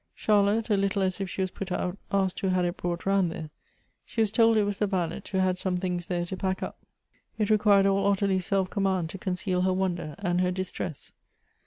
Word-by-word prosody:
Charlotte, 210 +1 +2
a 205 - +4
little 195 0 +1
as 185 +1 -1
if 195 - -2
she 190 - -3
was 185 -1 -1
put 190 -2 -6
out, 180 0 -1 0.2
asked 195 -2 +1
who 195 - -1
had 185 -1 +2
it 175 +1 -1
brought 175 -1 -3
round 195 -2 +3
there. 155 -2 -7 0.5
She - - -7
was 220 -2 +3
told 225 0 +4
it 215 - +4
was 205 -1 -2
the 210 - +2
valet, 185 0 -1
who 190 - 0
had 185 -1 +1
some 185 -1 -1
things 180 -2 -2
there 175 -1 -1
to 180 - -5
pack 190 0 -2
up. - - -6 0.6
It 215 -1 +1
required 205 -2 +5
all 195 0 +2
Ottilie's 195 -2 +1
self 195 -2 +1
command 190 -4 0
to 195 - -8
conceal 180 0 -1
her 185 0 +2
wonder 180 -5 -2
and 175 0 0
her 180 - +2
distress. 180 -4 -5
190 Hz, 225 wpm, -27 LUFS, 180-200 Hz, 0.6 s, required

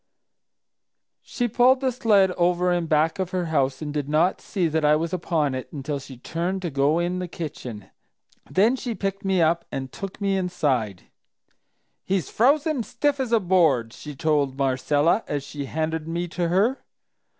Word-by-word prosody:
"She 245 - -2
pulled 250 +3 +4
the 260 -1 0
sled 210 -6 +3
over 180 0 +1
in 175 -2 0
back 160 +4 +2
of 185 -2 -1
her 180 -1 -2
house 135 0 +1
and 150 -1 -4
did 145 -1 -3
not 160 +5 +2
see 185 -5 -1
that 160 0 -1
I 150 0 +5
was 165 +2 -2
upon 160 -5 0
it 130 -1 -6
until 145 0 -4
she 135 -1 -11
turned 175 +8 -3
to 170 - -2
go 140 +3 +2
in 175 +1 -1
the 180 - -3
kitchen; 125 - -7 0.6
then 215 +7 +3
she 245 -3 -4
picked 195 0 -3
me 190 -3 +2
up 165 +1 +2
and 130 -1 -5
took 195 -1 -7
me 195 -1 +1
inside. 135 - -1 1.0
'He's 190 -2 -1
frozen 285 +4 +2
as 225 - -4
stiff 285 +5 0
as 255 -3 -2
a 230 - +5
board!' 160 - +2
she 150 -1 -9
told 145 -2 0
Marcella 145 - +2
as 145 -2 -2
she 140 0 -6
handed 160 +2 -3
me 170 +2 -2
to 175 0 -1
her. 205 +10 +1
170 Hz, 180 wpm, -24 LUFS, 145-195 Hz, 1.0 s, I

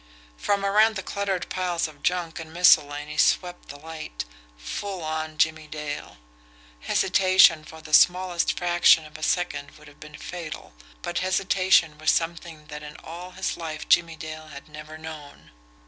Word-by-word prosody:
From 200 - -1
around 215 +3 +4
the 190 - -4
cluttered 195 -3 -2
piles 175 -2 -1
of 150 -2 -15
junk 175 -2 -1
and 160 -1 -9
miscellany 150 -3 +3
swept 180 -1 +1
the 145 - -8
light 155 - -7 0.3
full 180 - -5
on 155 0 -4
Jimmie 160 0 +1
Dale. 150 -1 -6 0.6
Hesitation 185 - +4
for 160 +1 -12
the 155 -1 -11
smallest 180 +1 +4
fraction 175 -2 +4
of 155 0 -15
a 155 - -9
second 155 -4 -2
would 150 0 -16
have 145 0 -17
been 155 0 -11
fatal, 165 - -8 0.3
but 175 - -2
hesitation 185 -4 +2
was 155 - +1
something 165 -2 -1
that 150 0 -8
in 150 0 -10
all 180 +2 -9
his 190 - -3
life 155 -2 -6
Jimmie 170 -1 +3
Dale 155 0 -8
had 140 -1 -11
never 155 +1 -10
known. 155 -2 -11
160 Hz, 160 wpm, -25 LUFS, 155-180 Hz, 0.6 s, around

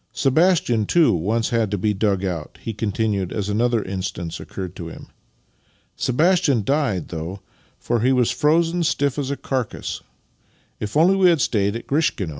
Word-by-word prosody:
Sebastian, 135 - +2
too, 170 -3 +4
once 105 +7 0
had 115 -3 +1
to 105 - -1
be 105 +3 0
dug 100 -1 0
out," 85 -5 -5
he 115 - -5
continued 105 -2 -1
as 105 -1 -3
another 115 +1 +1
instance 95 -3 -5
occurred 95 -3 -7
to 85 - -6
him. 80 - -11 0.5
" - - -39 0.2
Sebastian 150 - +2
died, 135 - 0
though, 85 +4 -6 0.4
for 120 0 -1
he 125 +4 +2
was 125 -3 +2
frozen 165 +3 +2
stiff 145 -3 0
as 135 -2 -2
a 140 - -2
carcase. 130 -4 -3 0.8
If 105 +7 -3
only 175 +5 +5
we 190 -2 +5
had 165 -3 +3
stayed 100 -4 +1
at 115 - -6
Grishkino! 140 - 0
115 Hz, 170 wpm, -22 LUFS, 100-145 Hz, 0.8 s, only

